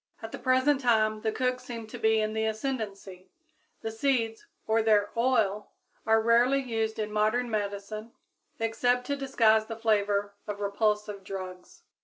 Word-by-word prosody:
At 225 - -6
the - - -7
present 260 +2 +2
time 215 -3 +2
the 220 - 0
cooks 255 +1 -1
seem 235 -3 -6
to 215 - -9
be 220 0 +3
in 215 0 -1
the 220 0 0
ascendancy; 210 -6 -4 0.5
the 225 - -3
seeds 225 -2 -1 0.2
or 220 +1 +2
their 210 -2 +3
oil 225 -4 +1 0.3
are 220 0 +5
rarely 235 +4 +4
used 225 -4 -2
in 215 -1 -3
modern 215 +3 +1
medicine, 210 +1 -4 0.5
except 245 +2 +1
to 285 - -1
disguise 225 -6 +3
the 225 - -5
flavor 205 -2 +1
of 205 -1 -4
repulsive 210 0 -1
drugs. 185 -2 -8
220 Hz, 155 wpm, -28 LUFS, 210-240 Hz, 0.5 s, are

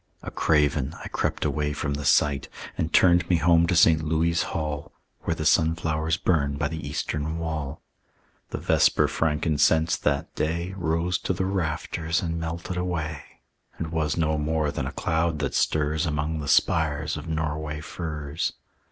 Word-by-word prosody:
A - - -6
craven 75 -2 +1
I - - -5
crept - - -1
away 75 -1 0
from 75 -1 -2
the 70 0 -4
sight; 70 0 +3 0.3
And 80 - -2
turned 90 -1 +4
me 90 - +4
home 85 +1 +4
to 90 - +1
St. 80 -1 +5
Louis' 80 +2 +1
Hall, 75 -2 -3 0.3
Where 80 - 0
the 80 - -4
sunflowers 80 +1 +2
burn 70 -5 +1
by 75 0 -1
the 80 -3 -5
eastern 75 +2 -2
wall. 80 -3 -4 0.7
The - - -4
vesper - - +3
frankincense 80 0 +2
that 70 -1 -1
day 85 +4 -2
Rose 85 0 0
to - - -1
the 95 +1 -1
rafters 85 -2 -1
and 85 -1 -2
melted 85 +2 -4
away, 80 -4 -2 0.6
And 80 -1 -4
was 80 -2 0
no 80 -2 +1
more 75 0 0
than - - -3
a - - -4
cloud 80 0 0
that 70 -2 -2
stirs 75 +1 +1
Among 80 +1 -1
the 75 - -5
spires 80 +1 +2
of 75 +1 -7
Norway 80 -1 -2
firs. 75 -1 -4
80 Hz, 160 wpm, -25 LUFS, 75-85 Hz, 0.7 s, St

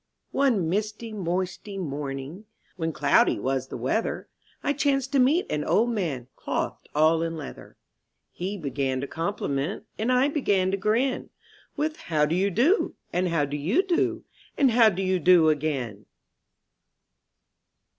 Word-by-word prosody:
/^NE 260 -9 +2
misty 215 +5 -2
moisty 185 +1 -3
morning, 140 -2 -4
^^ 210 - -15 0.3
When 165 -3 -2
cloudy 145 -2 +3
was 130 0 -1
the - - -6
weather, 130 - -2 0.3
I 285 - +1
chanced 275 -2 0
to 280 - +3
meet 285 +8 +4
an 150 0 0
old 235 +9 +2
man 160 - -2
Clothed - - -4
all 160 +2 +4
in 165 0 -2
leather. 150 - -9 0.5
He 190 +3 -4
began 135 -4 -2
to 140 - -4
compliment 165 +1 -3
And 225 +4 +1
I 255 +2 +4
began 200 -11 +1
to 195 - 0
grin, 230 +7 0 0.5
With 310 +1 -1
How 155 -2 +1
do 150 - -1
you 190 +3 +2
do, 270 - +2 0.2
and 180 +1 +1
"How 165 -4 +1
do 145 +1 -5
you 190 - +2
do,' 360 -3 0 0.3
And 270 -3 +4
How 230 -1 +6
do 195 -1 -3
you 185 -1 +1
do 170 -1 +6
again? 135 -9 -2
185 Hz, 155 wpm, -26 LUFS, 150-230 Hz, 0.5 s, How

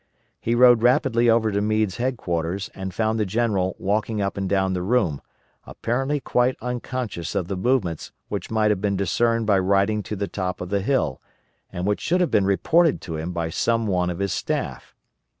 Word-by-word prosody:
He 115 - 0
rode 120 -1 +6
rapidly 120 -1 +3
over 115 -1 +3
to 100 0 0
Meade's 110 -2 0
headquarters 95 -7 -2
and 95 -1 -5
found 110 +3 0
the - - +2
general 100 -3 0
walking 105 +2 -1
up 100 -1 -1
and 95 -1 -3
down 95 -1 +1
the 90 - -2
room, 95 - +1 0.4
apparently 135 +5 -2
quite 125 0 +1
unconscious 120 -8 -4
of 90 - -1
the 95 - -3
movements 95 - -1 0.2
which - - -4
might 110 -1 +2
have 100 - -1
been 100 -2 0
discerned 115 +4 +1
by 100 -3 +3
riding 100 +3 +2
to 105 +2 -5
the 100 0 -3
top 95 -2 -3
of 90 - -6
the 100 0 0
hill, 100 - 0 0.5
and 90 +1 -4
which 105 0 0
should 175 +3 +1
have 180 - +1
been 100 - +3
reported 160 - +3
to 80 - -6
him 80 +3 -4
by 85 -2 -3
some 115 +6 +1
one 90 -3 0
of 90 - -4
his 100 -2 -1
staff. - - -4
105 Hz, 195 wpm, -23 LUFS, 95-120 Hz, 0.5 s, rode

